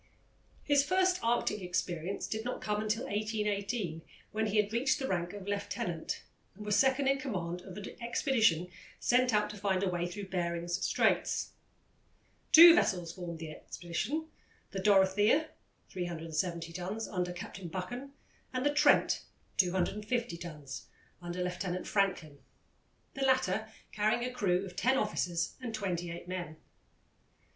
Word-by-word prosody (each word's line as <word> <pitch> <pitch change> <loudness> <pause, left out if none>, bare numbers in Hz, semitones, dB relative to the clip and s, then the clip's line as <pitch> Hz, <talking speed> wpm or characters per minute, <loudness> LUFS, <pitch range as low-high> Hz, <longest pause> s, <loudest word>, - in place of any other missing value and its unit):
His 285 -1 +4
first 370 +3 +2
Arctic 230 -3 +1
experience 180 0 -2
did 220 0 -3
not 250 - -3
come 210 0 -1
until 215 +3 -1
1818, 205 -4 -2 0.3
when 220 +1 0
he 210 +1 0
had 210 0 +2
reached 260 +5 +2
the 265 -2 -3
rank 175 -4 -1
of 205 -1 -8
lieutenant 190 -4 -3 0.3
and 210 +2 -9
was 210 -1 +2
second 265 +2 +3
in 275 0 +3
command 180 -10 -3
of 185 +1 -10
an 205 - -6 0.2
expedition 225 - +2 0.3
sent 250 +1 +3
out 210 -1 +3
to 210 - -9
find 195 -1 0
a - - +2
way 175 -1 -1
through 195 +2 -7
Behring's 170 -1 -1
Straits. - - +1 1.0
Two 335 +1 +12
vessels 180 - +1
formed 175 -2 -6
the 160 -1 -6
expedition 200 - -4 0.5
the 195 - -3
Dorothea, 205 +9 +4 0.4
370 170 -1 -3
tons, 190 +6 -4
under 180 -2 -2
Captain 175 +1 -7
Buchan, 245 +11 -5 0.4
and 255 +1 -2
the 290 - +3
Trent, 295 0 +4 0.4
250 210 +5 0
tons, 150 -6 -8 0.3
under 175 +1 -3
Lieutenant 180 0 -3
Franklin, 180 -8 0 0.7
the 275 - -6
latter 220 -6 +2 0.2
carrying 215 +3 +1
a 250 - -4
crew 190 -5 +1
of 180 -2 -10
ten 260 +6 +3
officers 170 -9 0
and 230 -3 -4
twenty 175 -4 -2
eight 170 +1 -7
men. 175 -4 -5
195 Hz, 145 wpm, -32 LUFS, 175-235 Hz, 1.0 s, Two